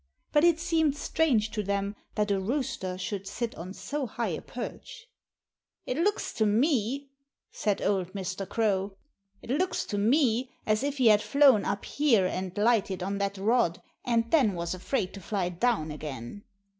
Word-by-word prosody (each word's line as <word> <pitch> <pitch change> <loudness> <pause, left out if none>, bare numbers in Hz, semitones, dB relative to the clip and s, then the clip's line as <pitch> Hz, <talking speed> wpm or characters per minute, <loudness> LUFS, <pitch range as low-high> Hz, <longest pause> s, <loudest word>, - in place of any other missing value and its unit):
But 295 - +4
it 340 -2 +5
seemed 320 -4 +1
strange 245 -9 +1
to 215 - -2
them 200 0 -2 0.2
that 210 -1 +1
a 195 - +2
rooster 190 -4 -2
should 195 +1 -4
sit 230 +3 -3
on 180 +3 -8
so 290 -2 -3
high 230 0 -2
a 160 - -3
perch. - - -8 0.8
"It 255 - -2
looks 395 +7 0
to 220 - +1
me," 265 +3 +1 0.4
said 205 -3 -1
old 190 -2 0
Mr. 190 -1 -4
Crow, 200 -3 0 0.5
"it - - -6
looks 365 +7 0
to 205 - -2
me 250 +2 +2 0.2
as 215 0 +2
if 285 +1 -2
he 250 -4 +5
had 210 -1 +6
flown 275 -6 +5
up 200 - -2
here 250 -10 +3
and 185 0 -3
lighted 205 -4 +2
on 200 +1 -2
that 200 0 -1
rod 205 -3 +2 0.2
and 230 -1 +1
then 250 - +4
was 170 0 -2
afraid 185 +1 -2
to 195 - -9
fly 185 0 -1
down 180 -4 0
again." 150 - -7
215 Hz, 170 wpm, -28 LUFS, 195-265 Hz, 0.8 s, had